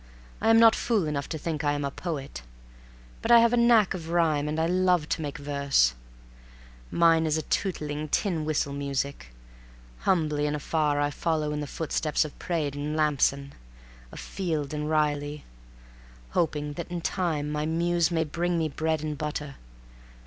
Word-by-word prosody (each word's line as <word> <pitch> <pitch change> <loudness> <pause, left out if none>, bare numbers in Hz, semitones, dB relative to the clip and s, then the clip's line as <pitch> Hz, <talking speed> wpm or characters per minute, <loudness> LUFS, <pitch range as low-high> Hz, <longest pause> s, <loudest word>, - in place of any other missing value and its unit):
I 220 - +2
am 225 - +7
not 225 -1 +7
fool 220 -7 0
enough 140 -2 -3
to 160 - -3
think 155 -1 -3
I 145 -1 +2
am 145 -1 -2
a 140 - -2
poet, 140 - -5 0.8
but 225 - -3
I 235 - +9
have 235 0 +5
a - - +3
knack 235 -4 +5
of 165 -3 -6
rhyme 160 -4 +2
and 155 +1 -2
I 160 - +2
love 180 -2 +2
to - - -1
make 145 -1 -4
verses. 140 - +2 1.0
Mine 165 -1 +4
is 155 0 +1
a 155 - -2
tootling, 150 -4 -2
tin 170 -2 0
whistle 150 -2 -1
music. 140 - -3 0.7
Humbly 150 -5 +1
and 150 - -1
afar 150 0 0
I 145 0 +1
follow 155 0 -1
in 150 - -2
the 145 - -4
footsteps 155 0 -1
of 150 - -10
Praed 155 -5 -2
and 145 +1 -3
Lampson, 140 -2 +1 0.6
of - - -9
Field 155 -7 -3
and 150 0 -3
Riley, 150 -1 0 0.9
hoping 150 -3 -1
that 170 +3 -6
in 175 -1 -4
time 160 -5 -1
my 150 0 -1
Muse 170 0 +1
may 165 -2 +1
bring 170 +3 -1
me 160 -1 0
bread 155 +1 -1
and 155 -1 -3
butter. 150 -1 -4
155 Hz, 175 wpm, -27 LUFS, 145-170 Hz, 1.0 s, I